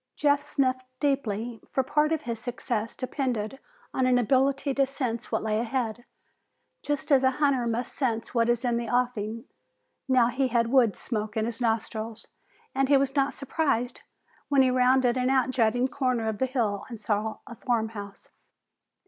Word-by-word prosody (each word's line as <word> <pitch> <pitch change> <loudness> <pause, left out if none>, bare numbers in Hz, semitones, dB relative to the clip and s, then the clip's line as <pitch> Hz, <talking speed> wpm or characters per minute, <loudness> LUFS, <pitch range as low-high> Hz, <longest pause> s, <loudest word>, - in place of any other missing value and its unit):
Jeff 285 -1 +3
sniffed 255 -3 -1
deeply, 240 -5 -1
for 265 - +1
part 300 +4 +1
of 320 -2 0
his 235 -2 -4
success 235 -2 -3
depended 255 -3 -3 0.3
on 260 -1 +2
an 250 -1 +4
ability 270 +3 +2
to 275 - +3
sense 260 -4 -3
what - - 0
lay 215 0 0
ahead, 240 -1 -2 0.8
just 290 +1 -3
as 270 -1 +5
a 260 - +5
hunter 275 -5 +2
must 230 +2 -2
sense 235 -7 -2
what 230 -1 +2
is 240 +1 +1
in 240 -1 +1
the 235 -1 -3
offing. 230 -2 -1 0.6
Now 255 -3 +4
he 260 +2 0
had 235 -1 +1
wood 245 -6 +4
smoke 215 -2 -4
in 220 - +1
his 235 +1 -4
nostrils, 225 -1 -2 0.5
and 270 0 +1
he 285 - +6
was 270 0 0
not 275 -1 +1
surprised 265 -4 -1 0.5
when 275 -2 +5
he 255 - +3
rounded 255 0 +3
an 250 0 +1
outjutting 255 -2 +2
corner 255 -5 0
of 220 -2 -2
the 260 - +2
hill 225 -6 -1
and 230 -3 -7
saw 215 +1 -1
a - - -9
farm 230 -2 -1
house. 205 -2 -10
245 Hz, 175 wpm, -27 LUFS, 225-270 Hz, 0.8 s, he